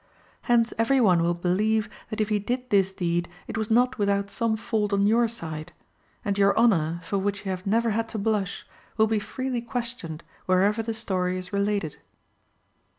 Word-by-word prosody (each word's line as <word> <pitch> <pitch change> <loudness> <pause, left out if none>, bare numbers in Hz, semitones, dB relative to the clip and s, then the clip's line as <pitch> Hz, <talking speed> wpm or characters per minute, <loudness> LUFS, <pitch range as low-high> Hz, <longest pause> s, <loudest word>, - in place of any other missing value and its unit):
Hence 235 -1 +4
every 260 +4 +3
one 185 -8 +4
will 170 +1 +1
believe 210 +5 +1 0.2
that 215 - -5
if 215 0 +1
he 210 -1 +2
did 250 +4 -3
this 195 -2 +4
deed 175 -2 -1 0.2
it - - -6
was 220 0 -2
not 245 +2 +3
without 200 0 +1
some 230 -2 0
fault 215 -2 -1
on 200 0 +3
your 230 +3 +4
side; 160 -9 -7 0.5
and 200 0 0
your 200 0 +4
honour, 170 -8 +3
for 195 +4 -1
which 200 +1 -2
you 190 - -1
have 185 +1 -5
never 230 +3 +2
had 225 +1 -1
to 225 - -5
blush, 205 -2 -1 0.3
will 220 - +5
be 220 -1 +1
freely 255 +3 -3
questioned 235 -9 -5 0.2
wherever 195 +4 +3
the 225 0 -3
story 185 -4 -1
is 185 +2 -7
related." 200 -5 0
205 Hz, 185 wpm, -26 LUFS, 185-225 Hz, 0.5 s, will